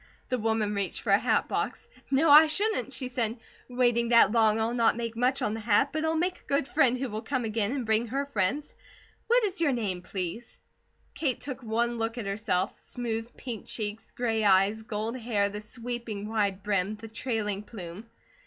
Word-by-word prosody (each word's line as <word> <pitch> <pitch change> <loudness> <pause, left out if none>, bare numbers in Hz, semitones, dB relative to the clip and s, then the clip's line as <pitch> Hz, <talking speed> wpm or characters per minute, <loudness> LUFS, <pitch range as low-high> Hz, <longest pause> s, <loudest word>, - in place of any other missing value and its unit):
The 255 - 0
woman 220 -1 0
reached 200 -2 -2
for - - -1
a - - +6
hat - - +1
box. - - -3 0.2
"No, 285 +3 +4
I 305 +2 +10
shouldn't!" 310 - 0
she 255 0 -3
said. 235 -2 -1 0.3
"Waiting 240 -2 +2
that 235 -4 +6
long, 220 -1 +4
I'll 225 +2 0
not 230 -2 +3
make 230 -1 -4
much 250 +3 +1
on 210 - 0
the 225 - -4
hat, 220 +5 +3
but 310 0 -1
I'll 320 0 +1
make 360 +3 0
a - - -28
good 280 -1 +1
friend 255 -5 +3
who 265 +1 -2
will 215 -1 -4
come 250 +1 -2
again, 215 -1 0
and 265 -3 -2
bring 220 +2 +2
her 275 +5 -1
friends. 275 +3 -1 0.5
What 485 +1 +4
is 380 -5 -1
your 310 -4 +3
name, 200 -7 -2
please?" 190 +5 -5 0.5
Kate 275 -6 0
took 265 -2 -6
one 235 +1 -1
look 225 +1 -2
at 235 - -4
herself 195 -1 -1
smooth 230 -1 -4
pink 235 -5 -7
cheeks, 215 -1 -5
gray 225 -3 -1
eyes, 200 +2 +4
gold 220 +1 -3
hair, 220 -4 0
the 210 +1 -6
sweeping 230 -2 -5
wide 200 -3 -1
brim, 200 0 0
the 220 +2 -10
trailing 220 -3 -2
plume. 205 -1 -9
230 Hz, 200 wpm, -28 LUFS, 210-255 Hz, 0.5 s, I